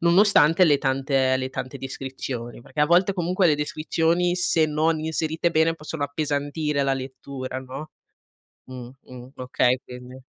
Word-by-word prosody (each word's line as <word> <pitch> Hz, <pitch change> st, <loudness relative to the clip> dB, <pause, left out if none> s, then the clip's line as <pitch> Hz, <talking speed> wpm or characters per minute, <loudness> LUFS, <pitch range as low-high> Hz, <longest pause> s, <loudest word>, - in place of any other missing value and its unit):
nonostante 170 Hz, -1 st, +5 dB
le 145 Hz, -4 st, +4 dB
tante 135 Hz, -1 st, +1 dB
le 130 Hz, 0 st, -4 dB
tante 130 Hz, +1 st, -6 dB
descrizioni. 130 Hz, -3 st, -6 dB
Perché 130 Hz, +5 st, -6 dB
a 150 Hz, -, +5 dB
volte 180 Hz, +4 st, +4 dB
comunque 180 Hz, +1 st, +1 dB
le 155 Hz, -, +4 dB
descrizioni, 165 Hz, +4 st, 0 dB
se 165 Hz, -3 st, +2 dB
non 155 Hz, +1 st, +1 dB
inserite 160 Hz, +1 st, -1 dB
bene, 165 Hz, 0 st, +2 dB
possono 155 Hz, -1 st, -6 dB
appesantire 145 Hz, 0 st, -1 dB
la 135 Hz, -1 st, +1 dB
lettura, 130 Hz, 0 st, -6 dB
no. 135 Hz, +4 st, -8 dB, 0.8 s
Mhmm, 125 Hz, -2 st, -9 dB
mhmm, 125 Hz, 0 st, -12 dB
okay 125 Hz, 0 st, +1 dB
quindi. 125 Hz, +1 st, -11 dB
145 Hz, 145 wpm, -24 LUFS, 130-160 Hz, 0.8 s, nonostante